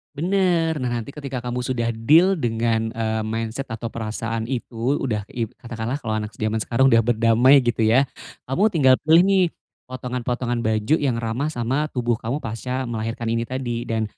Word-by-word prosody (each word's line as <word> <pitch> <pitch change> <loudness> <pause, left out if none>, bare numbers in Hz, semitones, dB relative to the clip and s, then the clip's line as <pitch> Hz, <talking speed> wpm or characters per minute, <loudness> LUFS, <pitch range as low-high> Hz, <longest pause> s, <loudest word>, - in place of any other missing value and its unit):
Bener 175 -1 +1
nah 125 -4 -2
nanti 130 +5 -9
ketika 140 -4 -5
kamu 125 +1 -3
sudah 120 -2 -1
deal 160 +12 +5
dengan, 115 -5 0
eee, 110 -1 -2
mindset 115 +3 -3
atau 115 +1 -4
perasaan 115 0 -4
itu 120 +2 -2
udah 110 -6 -2
ib 115 -3 -4
katakanlah 120 +1 -5
kalau 110 - -2
anak 105 0 -6
zaman 110 +1 -1
sekarang 130 +4 +2
udah 115 - +6
berdamai 120 +4 +4
gitu 120 -1 -1
ya, 115 +4 +4 0.4
kamu 160 +12 +2
tinggal 145 -10 +4
pilih 165 +3 +7
nih, 195 -1 +4 0.4
potongan-potongan 125 -1 -3
baju 110 +4 +1
yang 135 -5 0
ramah 115 +5 -2
sama 135 +2 -1
tubuh 120 -2 0
kamu 130 +7 -3
pasca 125 +4 -3
melahirkan 115 0 -3
ini 115 0 -1
tadi 120 -2 -3
dan, 110 -1 0
120 Hz, 170 wpm, -22 LUFS, 115-135 Hz, 0.4 s, pilih